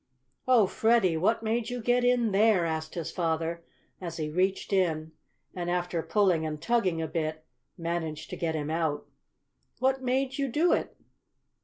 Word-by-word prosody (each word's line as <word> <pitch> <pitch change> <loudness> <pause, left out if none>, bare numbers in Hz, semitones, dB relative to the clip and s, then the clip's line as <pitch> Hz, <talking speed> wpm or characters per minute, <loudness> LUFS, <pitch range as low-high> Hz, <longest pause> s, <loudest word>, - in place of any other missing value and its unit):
"Oh, 245 -5 +6
Freddie! 220 -3 +2
what 200 +8 +1
made 225 +1 -1
you 245 0 -3
get 245 +2 +2
in 245 -3 +3
there?" 200 -3 +4
asked 160 -1 -3
his 170 -3 -4
father, 165 0 -1 0.4
as 170 -2 -5
he 155 -2 -3
reached 190 +4 0
in, 160 -4 +1 0.4
and, 175 -1 -3
after 175 -1 -1
pulling 185 -4 +2
and 155 -1 -3
tugging 195 -6 +1
a - - -2
bit, 155 -1 -3 0.3
managed 165 -2 -4
to - - -3
get 160 -2 -2
him 150 0 -3
out. 160 -3 -1 0.7
"What 265 +1 +1
made 260 +1 -1
you 275 - +1
do 310 +8 +2
it?" - - -2
180 Hz, 165 wpm, -28 LUFS, 160-230 Hz, 0.7 s, Oh